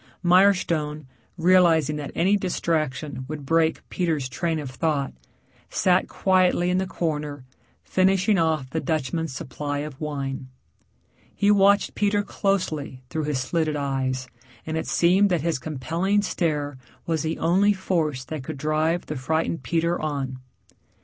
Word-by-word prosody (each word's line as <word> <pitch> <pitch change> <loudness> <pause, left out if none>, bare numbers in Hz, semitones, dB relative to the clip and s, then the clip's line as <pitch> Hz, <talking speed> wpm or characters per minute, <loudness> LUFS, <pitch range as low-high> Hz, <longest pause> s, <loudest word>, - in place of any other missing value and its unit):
Mirestone, 175 -5 +3 0.3
realizing 165 -4 +4
that 145 -2 -5
any 190 +4 +3
distraction 155 -8 -1
would 150 -1 -6
break 165 +2 +1
Peter's 160 -7 -1
train 160 +6 -2
of 145 -4 -5
thought, 140 -1 -1 0.6
sat 185 0 +2
quietly 185 -2 +2
in 180 - +2
the 190 - -1
corner 150 -6 -3 0.4
finishing 190 +2 +2
off 160 -5 +1
the 160 - -1
Dutchman's 160 0 -2
supply 145 +2 -4
of 145 -1 -6
wine. 135 -3 -4 0.9
He 205 0 +3
watched 200 0 +4
Peter 205 0 +1
closely 160 -11 -2
through 155 -2 -2
his 145 -3 -1
slitted 155 +3 0
eyes, 130 -2 -2 0.4
and 160 - -3
it 160 - -2
seemed 190 +4 +4
that 175 -4 +1
his 165 -3 0
compelling 165 +9 -1
stare 145 -7 -1 0.3
was 165 -3 0
the 160 +1 -2
only 190 +5 +3
force 165 -9 -1
that 150 0 -6
could 150 +2 -6
drive 155 +4 0
the 150 - -5
frightened 160 +5 -1
Peter 170 0 0
on. 135 -4 -3
160 Hz, 140 wpm, -24 LUFS, 145-180 Hz, 0.9 s, realizing